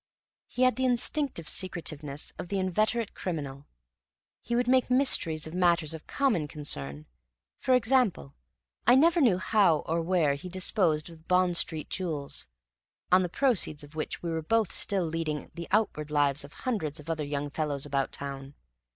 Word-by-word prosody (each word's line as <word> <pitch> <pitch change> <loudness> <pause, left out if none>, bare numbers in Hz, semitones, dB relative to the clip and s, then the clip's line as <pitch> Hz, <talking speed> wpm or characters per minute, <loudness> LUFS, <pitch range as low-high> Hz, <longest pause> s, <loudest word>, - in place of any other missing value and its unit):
He 255 - -1
had 255 0 +4
the 260 - 0
instinctive 245 - +1
secretiveness 155 -6 -3
of - - -5
the 200 - -2
inveterate 215 +4 0
criminal. 145 -6 -5 0.7
He 235 - -2
would 245 0 +1
make 255 -1 +3
mysteries 220 - +2
of 160 - -8
matters 170 -3 +2
of 160 - -9
common 230 - +1
concern; 75 - -4 0.5
for 255 0 +3
example, 235 - +1 0.5
I 245 - +8
never 335 +5 +5
knew 225 -10 +4
how 185 -5 +3
or 165 +1 -1
where 165 -4 +2
he 145 +6 -7
disposed 175 -3 0
of 165 - -13
the - - -24
Bond 180 -1 +2
Street 160 -2 0
jewels, 155 - -3 0.6
on 185 +1 +6
the 180 - -1
proceeds 195 - +1
of 145 +1 -13
which 155 +2 -4
we 170 - -2
were 160 0 -1
both 220 +4 +1
still 195 -3 +1
leading 160 -2 -3
the 170 -1 -7
outward 185 -8 0
lives 145 -1 +2
of 140 - -11
hundreds 175 - -3
of 150 - -12
other 160 -2 -2
young 145 0 -3
fellows 145 -3 -2
about 140 -2 -1
town. 140 0 -7
170 Hz, 170 wpm, -28 LUFS, 150-215 Hz, 0.7 s, I